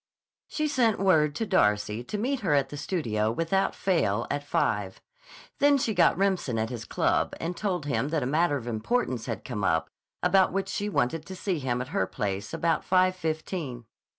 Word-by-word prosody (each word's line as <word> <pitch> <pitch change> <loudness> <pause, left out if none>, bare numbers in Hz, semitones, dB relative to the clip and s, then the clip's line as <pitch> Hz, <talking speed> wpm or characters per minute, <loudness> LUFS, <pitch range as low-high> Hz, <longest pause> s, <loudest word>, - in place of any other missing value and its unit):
She 305 0 -1
sent 245 -7 +2
word 155 -6 +3
to 225 - -1
Darcy 105 - +1
to 210 - -4
meet 260 +5 -1
her 170 -10 +1
at 135 -1 +1
the 145 - -7
studio 110 - -1
without 165 +9 0
fail 120 - +1
at 145 - -2
five. 100 -8 -1 0.6
Then 285 0 +5
she 235 -4 0
got 180 -3 +4
Remsen 190 -11 0
at 110 +2 -1
his 120 -2 -6
club - - 0
and 170 +2 -3
told 180 -7 -2
him 140 -1 0
that 155 -3 0
a - - -1
matter 150 +2 +2
of 120 - -8
importance 120 - -1
had - - -4
come 105 -6 -4
up 80 -3 +1 0.3
about 185 +1 +4
which 195 0 -2
she 205 +1 -2
wanted 160 -3 0
to 190 - -7
see 185 -2 -2
him 125 -2 -1
at 130 - -12
her 95 - 0
place 100 0 -3
about 165 -2 0
five 185 0 +3
fifteen. 155 -6 -4
155 Hz, 195 wpm, -27 LUFS, 120-190 Hz, 0.6 s, Then